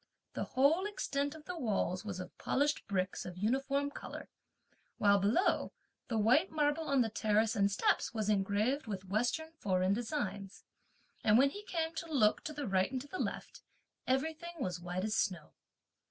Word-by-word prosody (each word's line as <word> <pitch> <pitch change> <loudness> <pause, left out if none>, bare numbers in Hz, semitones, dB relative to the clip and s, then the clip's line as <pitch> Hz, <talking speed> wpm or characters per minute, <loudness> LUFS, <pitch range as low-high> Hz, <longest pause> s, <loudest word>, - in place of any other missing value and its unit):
The - - -2
whole 305 +9 +3
extent 285 -7 -2
of 310 -1 -12
the 360 -2 -5
walls 200 - 0
was 200 -4 -5
of 180 - -8
polished 290 +2 0
bricks 185 -2 -1
of 180 -1 -8
uniform 270 +7 0
colour; - - -8 0.7
while 200 -1 +5
below, 215 - +2 0.3
the 225 - -1
white 250 - +4
marble 300 +1 +1
on 275 -2 +3
the 225 - +1
terrace 215 +1 +2
and 200 -1 +3
steps 200 - +1
was 220 -3 -2
engraved 215 +7 +1
with 195 -3 -4
western 245 +10 0
foreign 185 -1 +2
designs; 200 -5 -3 0.6
and 210 0 +5
when 275 +2 +5
he 410 - -7
came 325 -3 -2
to 325 0 -6
look 215 -8 +3
to - - -3
the 290 -1 -4
right 190 +1 +2
and 260 -1 -2
to 285 - -10
the 370 - -6
left, - - -4 0.5
everything 320 +6 -1
was 180 - -3
white 180 +1 -3
as 215 +1 0
snow. 175 -9 -1
230 Hz, 175 wpm, -33 LUFS, 200-290 Hz, 0.7 s, while